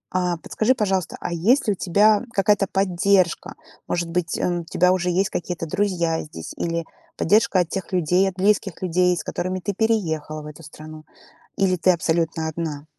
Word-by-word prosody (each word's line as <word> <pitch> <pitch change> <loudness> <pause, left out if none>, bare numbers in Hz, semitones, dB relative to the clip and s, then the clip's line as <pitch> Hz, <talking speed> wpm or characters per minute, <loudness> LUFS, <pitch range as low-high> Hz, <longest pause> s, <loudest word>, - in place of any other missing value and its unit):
А 180 -2 0
подскажи, 220 +9 0
пожалуйста, 190 -6 -1
а 175 - -4
есть 220 - +2
ли 205 - +3
у - - -6
тебя 205 +4 +3
какая-то 200 0 +2
поддержка? 190 -1 +1 0.3
Может 170 -1 -2
быть, 175 0 -1
м, 175 -1 0
у - - -9
тебя 180 +2 +2
уже 180 -1 0
есть 185 +3 +1
какие-то 175 -1 -4
друзья 170 -2 0
здесь 80 - -9
или 170 -1 -2 0.3
поддержка 205 +1 +3
от 165 - -3
тех 190 0 -5
людей, 180 +2 +2
от 180 - -12
близких 195 -2 0
людей, 180 0 +2
с 150 - -4
которыми 185 +1 -3
ты 200 +2 -3
переехала 160 -9 -1
в - - -11
эту 150 +1 -10
страну? 155 +1 -11 0.5
Или 190 -2 +2
ты 185 +2 +4
абсолютно 165 -1 0
одна? 155 -2 -5
180 Hz, 180 wpm, -22 LUFS, 165-195 Hz, 0.5 s, ты